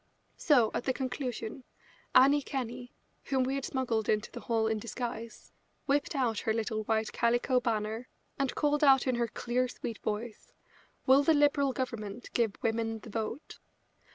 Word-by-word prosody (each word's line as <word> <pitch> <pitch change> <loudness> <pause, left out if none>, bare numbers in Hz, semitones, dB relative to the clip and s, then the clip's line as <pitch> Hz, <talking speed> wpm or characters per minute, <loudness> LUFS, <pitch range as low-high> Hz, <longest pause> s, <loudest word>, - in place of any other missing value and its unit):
So, 250 -8 +4
at - - -2
the 260 - +1
conclusion, 255 -2 -4 0.5
Annie 280 +3 +7
Kenney, 250 -3 -5 0.3
whom 265 -2 +1
we 260 +1 -1
had 275 -1 -2
smuggled 235 -5 -1
into 215 0 0
the - - -7
hall 225 -2 0
in 220 -1 0
disguise, 235 0 -6 0.3
whipped 285 +2 0
out 240 -6 +1
her 220 - 0
little 220 -1 -2
white 220 0 0
calico 240 +2 +2
banner, 225 0 -2 0.3
and 275 -2 0
called 295 0 +1
out 270 -3 +6
in 255 - +1
her 235 -1 0
clear, 250 +2 -1
sweet 230 -2 -6
voice: 215 +1 -5 0.5
"Will 265 +2 +6
the 315 +2 +4
Liberal 290 -1 +3
Government 230 -3 -5
give 225 -4 +1
women 225 -1 0
the 225 - -11
vote?" 225 +6 -5
240 Hz, 160 wpm, -30 LUFS, 225-265 Hz, 0.5 s, Annie